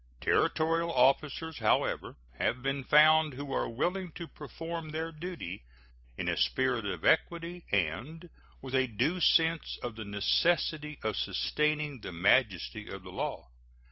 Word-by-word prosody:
Territorial 165 - +1
officers, 145 +3 +2
however, 110 - +1 0.2
have 125 +1 0
been 135 0 -1
found 155 +1 +5
who 140 0 -5
are - - 0
willing 175 +9 -2
to 170 - -7
perform 165 +2 -7
their 160 +1 -3
duty 155 - -7 0.5
in - - -3
a - - +1
spirit 125 -5 +1
of 95 - -4
equity 170 +2 +1
and 120 - -1 0.4
with 130 -1 -7
a 130 -1 +3
due 130 - 0
sense 165 -1 +3
of 120 -3 -4
the 110 - -6
necessity 150 - +1
of 110 -2 -1
sustaining 150 -4 -1
the - - -6
majesty 95 +2 +1
of - - -8
the - - -10
law. 60 - -4
150 Hz, 140 wpm, -30 LUFS, 120-165 Hz, 0.5 s, found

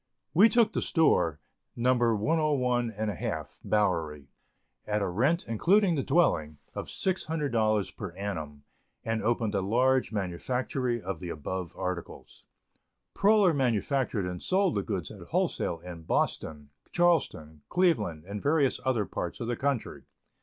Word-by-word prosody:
We 200 +8 +7
took 230 +1 +3
the - - 0
store 85 - +2 0.4
No. 125 +2 +3
101½ 120 - 0
Bowery, 80 -9 0 0.6
at 105 0 +1
a 100 - -1
rent 135 - +1
(including 180 - +3
the 145 - 0
dwelling) 105 - +1 0.2
of - - -5
$600 135 - 0
per 95 - -5
annum, 80 -8 -5 0.4
and 115 -1 -1
opened 115 0 0
a 100 - +1
large 125 +7 +2
manufactory 120 +6 -2
of 95 -2 -5
the 90 - -6
above 85 +3 -5
articles. 90 -2 -6 0.7
Proler 200 -3 +4
manufactured 125 -3 0
and 90 -1 -5
sold 190 -1 +2
the 100 - 0
goods 95 -6 -4
at - - -11
wholesale 85 - 0
in 85 -2 -9
Boston, 75 -2 -2 0.2
Charleston, 135 - +1
Cleveland, 115 - +1
and 100 +1 -6
various 145 -2 +2
other 120 -6 +1
parts 85 - -5
of 115 - -4
the 120 - -1
country. 135 -2 -2
115 Hz, 130 wpm, -28 LUFS, 90-140 Hz, 0.7 s, We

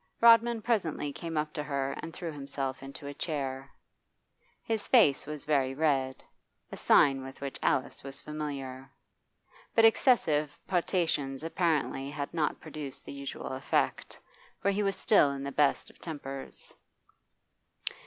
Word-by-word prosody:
Rodman 230 -1 +6
presently 165 -11 0
came 165 +1 -5
up 150 0 -1
to 150 - -3
her 140 -2 -2
and 165 - -6
threw 170 -1 -5
himself 140 -2 -4
into 135 +1 -9
a 140 - -5
chair. 135 -3 -3 0.9
His 225 -2 -2
face 150 - +5
was 150 -1 -6
very 135 -3 +1
red, 135 -4 +1 0.5
a - - -5
sign 135 -2 +4
with 135 0 -9
which 140 -1 -5
Alice 130 - 0
was 135 0 -8
familiar; 140 -3 -5 0.9
but 225 - +7
excessive 155 - +3
potations 165 -7 0
apparently 160 -5 0
had 145 -1 -5
not 160 -3 0
produced 150 -3 -8
the - - -7
usual 140 0 -6
effect, 130 0 -1 0.4
for 200 - +2
he 200 +1 0
was 195 -1 +1
still 195 -9 +4
in 140 0 -4
the 140 - -3
best 140 0 +2
of - - -26
tempers. 140 -4 -7
145 Hz, 145 wpm, -30 LUFS, 135-165 Hz, 0.9 s, but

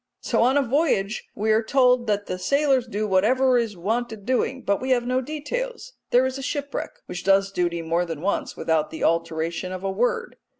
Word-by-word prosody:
So - - +1
on 255 +4 +4
a 285 - +3
voyage 240 -6 0
we 220 +2 0
are 215 +1 +4
told 250 0 +3
that 205 -1 0
the 185 - -4
sailors 275 +1 +2
do 215 -1 -2
whatever 245 +7 +3
is 220 -5 -3
wanted 220 +2 -2
doing, 260 +1 0
but 200 0 0
we 260 - -3
have 245 -2 +2
no 255 +1 +1
details. 485 - -5 0.2
There 250 +1 +4
is 260 +1 -3
a - - -5
shipwreck, 285 0 -4
which 180 - -6
does 195 0 +3
duty 175 -2 -1
more 170 +2 0
than 165 -3 -6
once 200 +3 -2
without 160 -2 0
the 160 - -6
alteration 165 +2 -1
of 185 0 -6
a 195 - -1
word. 245 - -1
225 Hz, 205 wpm, -24 LUFS, 190-260 Hz, 0.2 s, on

